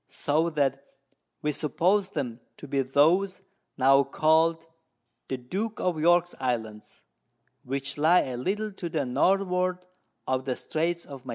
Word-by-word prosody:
so 155 Hz, +3 st, 0 dB
that 140 Hz, -3 st, 0 dB, 0.6 s
we 150 Hz, -, 0 dB
suppose 185 Hz, +7 st, +1 dB
them 125 Hz, -6 st, -4 dB, 0.2 s
to 145 Hz, -, -10 dB
be 140 Hz, 0 st, 0 dB
those 170 Hz, +9 st, +2 dB, 0.4 s
now 135 Hz, +1 st, +5 dB
call'd 160 Hz, +3 st, +2 dB, 0.6 s
The 130 Hz, -, -3 dB
Duke 195 Hz, -, -4 dB
of 175 Hz, -3 st, -1 dB
York's 175 Hz, +2 st, +3 dB
Islands, 110 Hz, -4 st, -4 dB, 0.6 s
which 135 Hz, +2 st, -4 dB
lie 160 Hz, +5 st, +5 dB
a 125 Hz, -2 st, -4 dB
little 210 Hz, -, -2 dB
to 175 Hz, -3 st, -5 dB
the 155 Hz, -4 st, -1 dB
Northward 180 Hz, +6 st, +1 dB, 0.5 s
of 130 Hz, 0 st, -1 dB
the 130 Hz, -2 st, -1 dB
Straits 170 Hz, +2 st, -2 dB
of 135 Hz, -3 st, -10 dB
Magillan. 130 Hz, -, -12 dB
155 Hz, 145 wpm, -27 LUFS, 135-180 Hz, 0.6 s, now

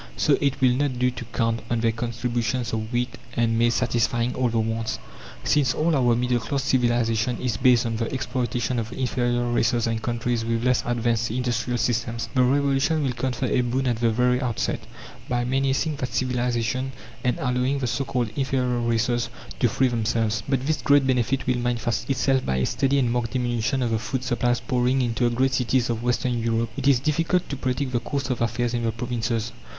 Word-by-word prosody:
So -, -, +4 dB
it 140 Hz, -2 st, +1 dB
will 130 Hz, -1 st, +5 dB
not 130 Hz, 0 st, 0 dB
do 125 Hz, +1 st, +2 dB
to 125 Hz, -1 st, -7 dB
count 115 Hz, 0 st, -1 dB
on 120 Hz, -1 st, 0 dB
their 115 Hz, -1 st, +3 dB
contributions 120 Hz, +1 st, -2 dB
of 110 Hz, 0 st, -3 dB
wheat 120 Hz, 0 st, -2 dB, 0.2 s
and 115 Hz, -1 st, +2 dB
maize 120 Hz, 0 st, +3 dB
satisfying 120 Hz, 0 st, +1 dB
all 125 Hz, -1 st, +1 dB
the 115 Hz, 0 st, 0 dB
wants. 110 Hz, 0 st, -1 dB, 0.5 s
Since 140 Hz, -4 st, +2 dB
all 160 Hz, +1 st, +2 dB
our 120 Hz, -3 st, +3 dB
middle 125 Hz, 0 st, +1 dB
class 135 Hz, +4 st, -2 dB
civilization 120 Hz, -2 st, +1 dB
is 125 Hz, -4 st, -1 dB
based 125 Hz, -1 st, +4 dB
on 115 Hz, -1 st, -1 dB
the 115 Hz, 0 st, -2 dB
exploitation 125 Hz, -1 st, -1 dB
of 115 Hz, +1 st, -4 dB
inferior 120 Hz, -2 st, 0 dB
races 120 Hz, 0 st, +2 dB
and 115 Hz, -1 st, -1 dB
countries 120 Hz, 0 st, -1 dB
with 115 Hz, 0 st, -1 dB
less 125 Hz, 0 st, +3 dB
advanced 115 Hz, -1 st, 0 dB
industrial 120 Hz, 0 st, -1 dB
systems, 115 Hz, 0 st, -1 dB
the 130 Hz, -, +3 dB
Revolution 140 Hz, +4 st, +2 dB
will 135 Hz, -, +1 dB
confer 125 Hz, +1 st, -2 dB
a 125 Hz, -, +2 dB
boon 125 Hz, +2 st, -1 dB
at 120 Hz, -3 st, +1 dB
the 115 Hz, 0 st, +2 dB
very 125 Hz, +3 st, +2 dB
outset, 120 Hz, -4 st, -1 dB, 0.5 s
by 120 Hz, -1 st, 0 dB
menacing 135 Hz, +4 st, 0 dB
that 130 Hz, -, -3 dB
"civilization," 125 Hz, +1 st, -1 dB, 0.3 s
and 125 Hz, -, +1 dB
allowing 125 Hz, +2 st, 0 dB
the 135 Hz, -, -2 dB
so 120 Hz, +3 st, -1 dB
called 120 Hz, -2 st, -1 dB
inferior 130 Hz, -3 st, 0 dB
races 120 Hz, 0 st, 0 dB, 0.3 s
to 120 Hz, -, +3 dB
free 130 Hz, +3 st, +2 dB
themselves. 115 Hz, -1 st, 0 dB
But 135 Hz, -1 st, 0 dB
this 155 Hz, +1 st, 0 dB
great 145 Hz, -2 st, +4 dB
benefit 130 Hz, 0 st, +1 dB
will 125 Hz, -1 st, +1 dB
manifest 120 Hz, -1 st, -1 dB
itself 135 Hz, 0 st, +2 dB
by 65 Hz, -, -1 dB
a 65 Hz, -, +1 dB
steady 140 Hz, 0 st, +1 dB
and 125 Hz, -4 st, +2 dB
marked 120 Hz, 0 st, -1 dB
diminution 125 Hz, +1 st, 0 dB
of 120 Hz, -, 0 dB
the 110 Hz, -, +1 dB
food 130 Hz, +2 st, -3 dB
supplies 120 Hz, -1 st, 0 dB
pouring 125 Hz, +1 st, +1 dB
into 120 Hz, 0 st, +1 dB
the 120 Hz, -, -3 dB
great 130 Hz, +2 st, +2 dB
cities 125 Hz, -1 st, +1 dB
of 115 Hz, -1 st, -3 dB
western 120 Hz, 0 st, 0 dB
Europe. 115 Hz, 0 st, 0 dB
It 140 Hz, -1 st, -2 dB
is 135 Hz, -3 st, +5 dB
difficult 165 Hz, +6 st, +1 dB
to 140 Hz, -, -2 dB
predict 130 Hz, 0 st, -2 dB
the 120 Hz, -, +1 dB
course 135 Hz, +2 st, -3 dB
of 125 Hz, -, -2 dB
affairs 120 Hz, +1 st, 0 dB
in 120 Hz, -, 0 dB
the 115 Hz, -1 st, 0 dB
provinces. 115 Hz, -1 st, -2 dB
120 Hz, 200 wpm, -24 LUFS, 115-130 Hz, 0.5 s, will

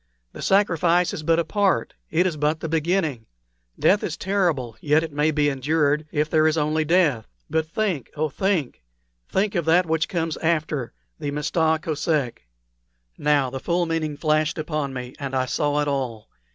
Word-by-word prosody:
The -, -, -9 dB
sacrifice 180 Hz, -3 st, +2 dB
is -, -, -4 dB
but 165 Hz, +1 st, +2 dB
a 170 Hz, -, +1 dB
part 200 Hz, +2 st, +1 dB, 0.2 s
it 170 Hz, +3 st, +2 dB
is 180 Hz, -4 st, 0 dB
but 150 Hz, +1 st, 0 dB
the 165 Hz, -, -4 dB
beginning. 160 Hz, -6 st, 0 dB, 0.5 s
Death 205 Hz, +2 st, +3 dB
is 165 Hz, -, -3 dB
terrible; 170 Hz, -, 0 dB
yet 155 Hz, +2 st, +3 dB
it 160 Hz, -2 st, -6 dB
may 150 Hz, +2 st, +2 dB
be 150 Hz, -1 st, +2 dB
endured 145 Hz, +2 st, +1 dB
if 150 Hz, 0 st, +1 dB
there 155 Hz, 0 st, +3 dB
is 160 Hz, +1 st, +1 dB
only 155 Hz, +1 st, +1 dB
death. 155 Hz, -8 st, +2 dB, 0.2 s
But 160 Hz, 0 st, +1 dB
oh! 195 Hz, -, 0 dB
oh 155 Hz, +1 st, 0 dB
think! 170 Hz, -, -1 dB, 0.5 s
think 200 Hz, +2 st, 0 dB
of 170 Hz, -5 st, -1 dB
that 175 Hz, +3 st, +4 dB
which 160 Hz, -1 st, 0 dB
comes 165 Hz, -3 st, -2 dB
after 155 Hz, -6 st, -1 dB, 0.3 s
the 145 Hz, -, -3 dB
Mista 160 Hz, +2 st, +1 dB
Kosek!" 150 Hz, -, -2 dB, 0.7 s
Now 145 Hz, -3 st, +2 dB
the 135 Hz, -, -4 dB
full 175 Hz, +4 st, 0 dB
meaning 160 Hz, -3 st, -2 dB
flashed 155 Hz, +1 st, +1 dB
upon 150 Hz, -3 st, -2 dB
me, 125 Hz, -1 st, -6 dB
and 135 Hz, -2 st, -4 dB
I 130 Hz, -1 st, +1 dB
saw 145 Hz, +3 st, 0 dB
it 145 Hz, -, -1 dB
all. 130 Hz, -6 st, -3 dB
155 Hz, 180 wpm, -23 LUFS, 145-165 Hz, 0.7 s, that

